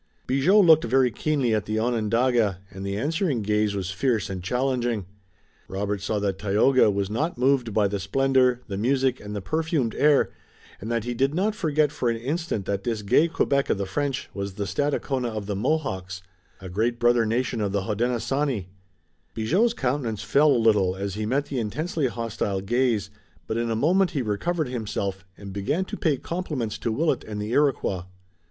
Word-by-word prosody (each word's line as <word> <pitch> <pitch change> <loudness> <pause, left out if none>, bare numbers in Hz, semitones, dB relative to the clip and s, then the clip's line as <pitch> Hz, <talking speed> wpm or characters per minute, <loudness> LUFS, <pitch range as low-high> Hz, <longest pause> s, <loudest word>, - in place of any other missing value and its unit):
Bigot 175 +11 +4
looked 160 -2 +6
very 125 +1 +3
keenly 135 -2 0
at 105 -1 0
the 110 +1 -1
Onondaga, 115 -2 +1
and 95 0 -8
the 100 0 -3
answering 145 - 0
gaze 105 0 +1
was 95 -1 -3
fierce 110 -1 0
and 95 -1 -4
challenging. 120 0 -1 0.6
Robert 100 +1 -3
saw 105 +2 -1
that 100 -2 -1
Tayoga 105 +5 +4
was 100 -1 0
not 140 - -2
moved 125 -2 +2
by 105 -1 +2
the 100 0 -3
splendor, 125 +4 +2
the 100 -2 -4
music 130 +2 +1
and 105 0 -7
the 100 - -4
perfumed 155 - 0
air, 145 -1 +3 0.5
and 110 +4 -5
that 115 -2 0
he 120 +1 -3
did 135 +5 0
not 205 +4 +1
forget 155 -6 +1
for 125 - -1
an 115 - 0
instant 135 - -3
that 100 0 -2
this 110 -2 -2
gay 145 +11 +4
Quebec 140 -5 0
of - - +2
the 100 - -2
French 140 +5 -2
was 100 -1 -4
the 100 -1 -3
Stadacona 135 +4 -1
of 110 -2 -5
the 100 0 -3
Mohawks, 95 - -2 0.4
a 95 - -8
great 110 +6 0
brother 120 0 +4
nation 115 +1 -1
of 100 -2 0
the 100 -1 -1
Hodenosaunee. 120 0 -1 0.7
Bigot's 185 - +2
countenance 125 -6 -2
fell 145 +8 +4
a 130 - +4
little 105 -5 +3
as 100 0 -4
he 105 +1 -3
met 140 +5 +1
the 135 -3 -3
intensely 150 +6 -1
hostile 115 -5 -3
gaze, 110 -1 0 0.3
but 110 - -3
in 115 0 -1
a 115 - 0
moment 175 - +3
he 130 - +1
recovered 155 +10 -1
himself 100 -5 -3
and 100 -1 -9
began 145 - -1
to - - -6
pay 150 -5 +1
compliments 150 - -4
to 115 - -1
Willet 145 +3 0
and 105 -1 -6
the 105 +2 -4
Iroquois. 125 -10 +1
115 Hz, 185 wpm, -25 LUFS, 100-140 Hz, 0.7 s, looked